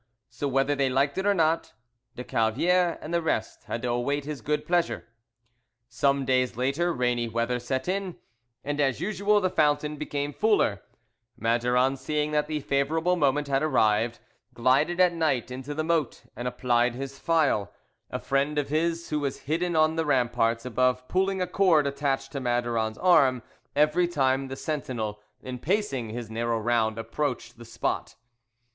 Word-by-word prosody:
So 145 - -3
whether 135 +1 +1
they 140 -2 +1
liked 140 +6 +1
it 195 - -1
or 205 - +4
not, 165 -1 +1 0.4
de 125 - -6
Calviere 170 +12 +1
and 155 - -6
the 170 - +2
rest 160 - -2
had 115 - -4
to 125 - -1
await 140 +4 -1
his 150 -4 -5
good 150 +5 -1
pleasure. 170 -12 0 0.8
Some 140 +3 +1
days 130 -2 +1
later 140 +8 0
rainy 125 -3 0
weather 115 +2 -1
set 130 +4 -3
in, 190 -1 -2 0.5
and 145 +1 -1
as 135 -3 +1
usual 205 +3 +2
the 185 -2 +1
fountain 150 -1 +1
became 145 -1 -3
fuller; 205 - +2 0.6
Maduron 125 +3 +2
seeing 150 +2 -1
that 150 0 +1
the 155 -1 -2
favourable 160 +6 +1
moment 145 -2 +1
had 135 -1 +1
arrived, 115 -6 +2 0.4
glided 135 +9 +2
at 180 -1 +5
night 150 -8 0
into 130 +3 -6
the 155 - -1
moat 160 -4 -1
and 120 +2 -4
applied 120 -1 +1
his 135 +1 -6
file, 155 - +1 0.4
a - - -3
friend 140 +2 0
of 145 -2 0
his 165 +2 -1
who 150 - +1
was 140 -2 -3
hidden 165 +4 -1
on 155 +1 +3
the 165 - +1
ramparts 120 -3 +1
above 125 +1 +1
pulling 190 0 +1
a - - -3
cord 175 -7 +3
attached 140 -1 -1
to 140 - -4
Maduron's 120 -3 -1
arm 135 -9 +4 0.3
every 150 +4 +3
time 135 -4 +1
the 135 - -6
sentinel, 120 -9 -4 0.2
in 125 -1 -6
pacing 145 - -1
his 115 0 -6
narrow 115 +1 -1
round, 110 -1 +1
approached 120 0 -3
the 115 - -10
spot. 115 - -3
140 Hz, 165 wpm, -27 LUFS, 125-155 Hz, 0.8 s, at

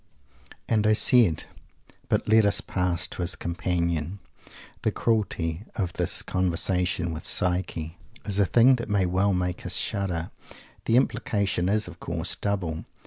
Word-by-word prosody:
"And 110 -2 +2
I 110 - +5
said" 110 - +5 0.7
but - - 0
let 110 0 +5
us 100 - +2
pass 90 -1 -1
to 90 - -6
his 90 +1 +1
Companion. 85 0 -2 0.6
The - - +1
cruelty 100 -6 -1
of 90 -6 -2
this - - -1
conversation 90 -1 0
with 80 +2 -6
"Psyche" 90 -3 -2 0.3
is 100 -1 -1
a 100 - +5
thing 125 +5 +5
that 115 -2 -6
may 100 -2 +2
well 95 +2 +1
make 90 0 -2
us 90 0 -2
shudder. 95 -6 -2 0.5
The 115 - +2
implication 100 -7 0
is, 105 +1 +1
of - - -11
course, 85 +1 -2
double. 90 -6 -2
90 Hz, 145 wpm, -26 LUFS, 85-100 Hz, 0.7 s, I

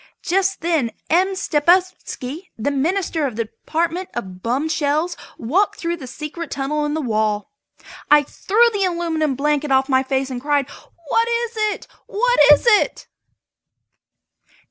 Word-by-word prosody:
Just 390 +2 0
then 320 -8 +1 0.2
M. 375 +3 +3
Stepupski, 345 -2 0
the 235 +6 -1
Minister 320 +1 0
of 245 - -6
the 230 0 -1
Department 340 - -3
of 185 -6 -6
Bum 255 +8 -1
Shells, 310 +3 0 0.2
walked 355 - +1
in - - -18
through 340 -1 -2
the 265 -6 -9
secret 300 +5 -7
tunnel 295 +2 -2
in 295 +1 -2
the 315 - -1
wall. 215 - -1 0.6
I 295 0 +6
threw 455 - +2
the 400 -1 0
aluminum 330 -5 0
blanket 295 +1 0
off 265 0 +3
my 260 -2 +3
face 265 0 -2
and 245 -1 -4
cried: 290 -1 +1 0.4
"What 460 0 +2
is 470 0 -1
it? 430 -1 -2 0.2
What - - +1
is 295 - +5
it?" 465 +2 +3
305 Hz, 150 wpm, -20 LUFS, 270-370 Hz, 0.6 s, I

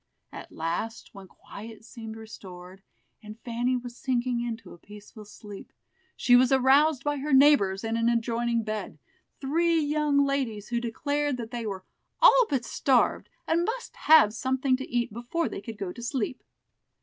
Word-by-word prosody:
At - - -10
last, 170 +8 -4
when 195 -1 -12
quiet 220 +4 -12
seemed 225 -2 -9
restored, 190 -4 -11 0.4
and 215 0 -11
Fanny 245 +2 -1
was 245 -1 -8
sinking 245 -1 -1
into 230 -1 -6
a 175 - -15
peaceful 210 +2 -13
sleep, 205 -1 -12 0.5
she 245 - +4
was 255 +1 +5
aroused 270 +2 +4
by 290 0 -1
her 290 +2 -4
neighbors 265 -9 +4
in 225 0 -2
an 230 0 +2
adjoining 235 0 0
bed, 215 -1 -5 0.4
three 330 +4 +1
young 295 -1 +1
ladies 250 -7 -2
who 235 -1 -1
declared 285 +4 -2
that 230 -1 -7
they 235 -2 -4
were 190 -2 -5 0.4
"all - - +6
but 265 -5 -1
starved, 260 -3 +1 0.2
and 335 +1 +2
must 465 +6 -4
have 305 -10 +5
something 260 +2 0
to 265 - -7
eat 240 -3 -1
before 240 +9 -2
they - - -6
could 225 0 -8
go 190 -3 -5
to - - -10
sleep." 250 0 -3
240 Hz, 165 wpm, -27 LUFS, 220-275 Hz, 0.5 s, all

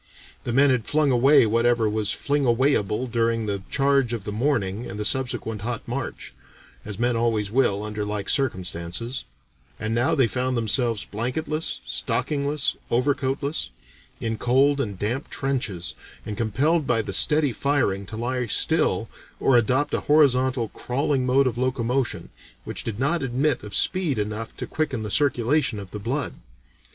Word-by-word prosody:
The 120 - -1
men 135 +3 +5
had 125 -4 0
flung 150 -1 +2
away 130 +2 +6
whatever 115 +1 +2
was 105 -1 0
fling 145 0 0
away 130 +3 +3
able 105 +3 0
during 115 -1 0
the 100 -2 -2
charge 140 -3 +2
of 115 -4 -3
the 105 - -4
morning 110 -3 -1
and 105 - -6
the 105 - -2
subsequent 120 -5 -1
hot 115 +1 -4
march 125 +2 -5 0.5
as 105 -2 -7
men 120 +1 +1
always 115 -3 0
will, 110 -5 +2
under 105 0 -3
like 105 -1 -3
circumstances 95 0 -1 0.5
and 110 +1 -2
now 120 +8 +2
they 135 -4 +4
found 125 +2 -1
themselves 115 -1 +1
blanketless, 145 +8 -2
stockingless, 145 0 0
overcoatless, 135 - 0 0.5
in 115 -1 -3
cold 140 +3 +3
and 100 -7 -4
damp 120 +9 -2
trenches, 120 -11 -2 0.3
and 105 - -4
compelled 140 +9 +1
by 115 -2 +2
the 100 - -5
steady 145 +7 +3
firing 110 -10 0
to 110 - -7
lie 125 +1 -2
still, - - +1 0.3
or 135 - +3
adopt 125 +5 +2
a - - +2
horizontal, 130 -5 +3
crawling 130 +1 -1
mode 135 +2 +4
of 125 -2 -1
locomotion, 130 0 -1 0.3
which - - -4
did 110 -1 -4
not 155 +6 +1
admit 135 +3 0
of 105 -1 -7
speed 175 -9 +1
enough 105 +2 -4
to - - -4
quicken 135 -8 -2
the 105 - -4
circulation 135 -2 +2
of 100 -2 -8
the 105 - -6
blood. 125 +6 -2
120 Hz, 160 wpm, -24 LUFS, 110-140 Hz, 0.5 s, away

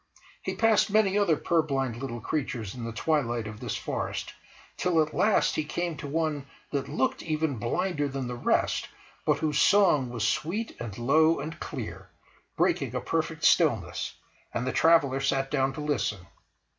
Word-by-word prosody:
He - - -3
passed 225 -1 +3
many 200 -2 +3
other 200 -7 +3
purblind 135 -8 0
little 120 -2 -5
creatures 120 -8 -3
in 120 -2 -6
the 115 - -4
twilight 120 -3 0
of 105 0 -7
this - - -3
forest, - - -4 0.4
till 180 -3 +1
at 155 -1 +1
last 215 -1 +3
he 155 - 0
came 170 +2 -3
to 145 - -6
one 150 -2 -1 0.2
that 140 -2 -2
looked 130 - 0
even 155 -4 -1
blinder 145 - -1
than 135 -1 -4
the 125 - -4
rest, 120 - 0 0.4
but - - +4
whose 150 -2 +1
song 175 -10 +4
was 115 -3 -1
sweet 200 - -2
and 115 -4 -6
low 155 +7 +4
and 155 +3 -6
clear, - - -6 0.5
breaking - - +1
a - - +1
perfect - - -2
stillness; - - +2 0.4
and 120 - -1
the 130 - 0
traveller 155 -5 +4
sat 135 0 0
down 135 -2 +2
to 150 - -6
listen. 120 -11 -1
145 Hz, 170 wpm, -28 LUFS, 125-160 Hz, 0.5 s, but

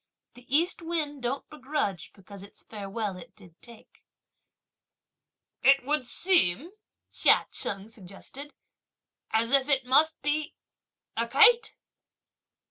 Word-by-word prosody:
The 245 +1 -18
East 335 +7 +1
wind 310 -4 -3
don't 250 +3 -3
begrudge 270 - -4
because 200 0 -14
its 200 - -14
farewell 205 -1 -5
it 175 - -14
did 180 -6 -18
take! 235 -2 -17 1.6
"It 275 -1 +4
would 285 -3 -1
seem," 335 - +1 0.4
Chia - - +4
Cheng 195 0 -2
suggested, 225 +7 -11 0.7
"as 225 +2 0
if 275 -1 +3
that 270 -3 +1
must 300 +5 +4
be 295 +2 -2 0.6
a 230 +1 -1
kite!" 450 - +4
260 Hz, 115 wpm, -27 LUFS, 210-300 Hz, 1.6 s, It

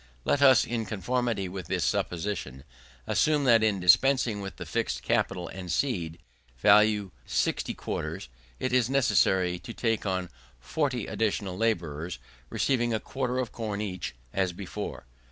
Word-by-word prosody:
Let 140 - +2
us, 130 -4 +7
in 115 -2 -3
conformity 115 0 -1
with 90 -2 -7
this 90 -2 0
supposition, 80 -4 -2 0.4
assume 150 -2 +2
that 115 -4 +5
in 105 -3 +2
dispensing 115 +4 +4
with 95 -1 -6
the - - -7
fixed - - -2
capital 90 -1 0
and 90 -2 -6
seed, 85 - -1 0.4
value 105 - +4 0.2
60 - - 0
quarters, - - -4 0.3
it 130 - -2
is 125 -2 +3
necessary 95 -9 +2
to 120 +3 -8
take 115 -2 0
on 95 -2 -2 0.3
40 125 - -1
additional 100 -4 -1
labourers, 85 -6 -1 0.3
receiving 120 -4 +1
a - - -1
quarter 130 0 -3
of 125 -4 -2
corn 105 -3 -4
each, 90 - -4 0.2
as 95 -2 0
before. 90 -8 -6
105 Hz, 145 wpm, -28 LUFS, 90-120 Hz, 0.4 s, us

